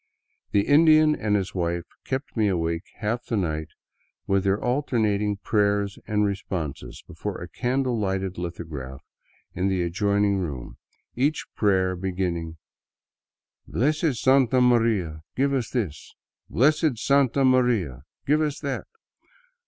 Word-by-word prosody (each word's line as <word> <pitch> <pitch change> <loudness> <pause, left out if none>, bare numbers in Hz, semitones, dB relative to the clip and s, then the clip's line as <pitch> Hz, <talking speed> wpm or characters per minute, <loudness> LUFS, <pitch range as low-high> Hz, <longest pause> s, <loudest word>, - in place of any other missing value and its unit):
The 100 -1 +2
Indian 155 +1 +6
and 105 -6 0
his 100 0 -1
wife 85 -1 -1 0.2
kept 135 +1 -4
me 110 -3 +2
awake 85 -3 -1
half 115 +2 -3
the 115 - -1
night 80 -4 -1 0.6
with 95 -1 +1
their 100 +1 +1
alternating 110 -6 0
prayers 100 -1 0
and 105 0 +1
responses 95 -7 -4
before - - -6
a - - -7
candle 125 -1 -1
lighted 95 -2 -2
lithograph 75 -6 -6 0.5
in 95 +1 0
the 95 -2 +1
adjoining 100 +3 +1
room, 75 -9 -5 0.4
each 145 +5 0
prayer 95 -3 +2
beginning, 90 -3 -3 0.6
" - - -56
Blessed 150 - +1
Santa 130 0 +3
Maria, 115 -10 +2
give 140 +1 +1
us 125 -4 -1
this; 100 - -4 0.3
Blessed 150 - +2
Santa 135 +2 +3
Maria, 120 - +2 0.2
give 150 +2 +3
us 150 -2 -1
that." 140 -3 -3
105 Hz, 130 wpm, -25 LUFS, 90-130 Hz, 0.6 s, Indian